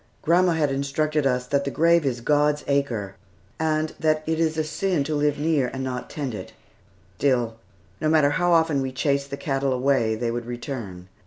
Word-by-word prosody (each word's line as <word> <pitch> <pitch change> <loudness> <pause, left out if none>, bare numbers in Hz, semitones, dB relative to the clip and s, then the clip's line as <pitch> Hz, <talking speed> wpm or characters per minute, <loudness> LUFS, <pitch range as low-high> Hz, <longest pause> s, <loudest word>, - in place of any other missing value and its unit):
Grandma 175 +2 +4
had 150 -3 +1
instructed 140 +2 0
us 125 -1 0
that 140 +2 0
the 140 - -2
graveyard 165 0 +3
is 120 -1 -8
"God's 150 +2 +2
acre," 120 -9 -1 0.5
and 155 0 0
that 155 -1 +1
it 160 0 -1
is 160 -1 +1
a 155 - +1
sin 170 0 -1
to 155 +2 -3
live 145 -1 +1
near 150 -3 +1
and 130 +1 -5
not 125 -1 -4
tend 140 -5 -4
it. 105 - -8 0.7
Still, 120 -5 +1 0.4
no 155 - +1
matter 155 -2 +4
how 175 +3 +1
often 160 -4 +3
we 130 0 -2
chased 140 +1 0
the 140 - -5
cattle 135 -1 -1
away, 125 -3 +1
they 115 +1 -2
would 120 0 -4
return. 120 -7 -6
140 Hz, 190 wpm, -24 LUFS, 130-155 Hz, 0.7 s, Grandma